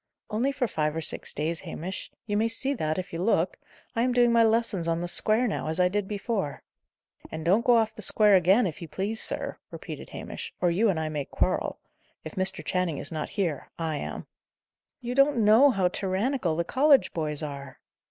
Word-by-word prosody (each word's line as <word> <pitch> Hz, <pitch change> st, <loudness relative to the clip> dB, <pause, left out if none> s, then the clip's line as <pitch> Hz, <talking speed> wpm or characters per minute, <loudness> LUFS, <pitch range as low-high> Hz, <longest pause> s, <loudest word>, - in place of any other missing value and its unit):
"Only 240 Hz, +6 st, +1 dB
for 255 Hz, -2 st, -1 dB
five 155 Hz, -5 st, -1 dB
or 165 Hz, -, -2 dB
six -, -, +3 dB
days, 160 Hz, +3 st, -2 dB
Hamish. 185 Hz, +5 st, -6 dB, 0.2 s
You 205 Hz, -, -2 dB
may 220 Hz, +2 st, +2 dB
see 265 Hz, +5 st, 0 dB
that, 155 Hz, -, -2 dB
if 185 Hz, -1 st, -5 dB
you 165 Hz, -, -3 dB
look. 185 Hz, -3 st, +1 dB, 0.4 s
I 230 Hz, -, +1 dB
am 250 Hz, +1 st, +1 dB
doing 240 Hz, -1 st, +4 dB
my 230 Hz, 0 st, +5 dB
lessons 220 Hz, -6 st, +1 dB
on 165 Hz, 0 st, 0 dB
the 175 Hz, -, -3 dB
square, 220 Hz, +7 st, +2 dB
now, 205 Hz, -, -3 dB
as 160 Hz, +3 st, -2 dB
I 180 Hz, 0 st, +4 dB
did 205 Hz, +1 st, -2 dB
before." 205 Hz, -6 st, -3 dB, 0.7 s
"And 160 Hz, 0 st, -6 dB
don't 200 Hz, +7 st, +3 dB
go 240 Hz, -1 st, +5 dB
off 220 Hz, -1 st, +1 dB
the -, -, -10 dB
square 210 Hz, -2 st, +4 dB
again, 190 Hz, +6 st, +4 dB
if 175 Hz, -1 st, -5 dB
you 170 Hz, -, -6 dB
please, 205 Hz, +7 st, -2 dB
sir," -, -, -2 dB
repeated -, -, -8 dB
Hamish, -, -, -7 dB
"or 175 Hz, -, +2 dB
you 210 Hz, +6 st, +2 dB
and 175 Hz, -5 st, 0 dB
I 155 Hz, -1 st, -2 dB
may 150 Hz, -2 st, -3 dB
quarrel. -, -, -1 dB, 0.5 s
If 155 Hz, -, -8 dB
Mr. 185 Hz, -4 st, +1 dB
Channing 180 Hz, -4 st, -1 dB
is -, -, -5 dB
not 155 Hz, -2 st, -4 dB
here, 175 Hz, -8 st, -3 dB
I 160 Hz, -2 st, -2 dB
am." -, -, -6 dB, 0.8 s
"You 245 Hz, 0 st, -4 dB
don't 275 Hz, +1 st, +4 dB
know 225 Hz, +7 st, +7 dB
how 195 Hz, -7 st, +2 dB
tyrannical 190 Hz, -, -1 dB
the 170 Hz, -, 0 dB
college 275 Hz, -, +3 dB
boys 155 Hz, -2 st, -2 dB
are." 140 Hz, -3 st, -7 dB
190 Hz, 210 wpm, -27 LUFS, 165-230 Hz, 0.8 s, know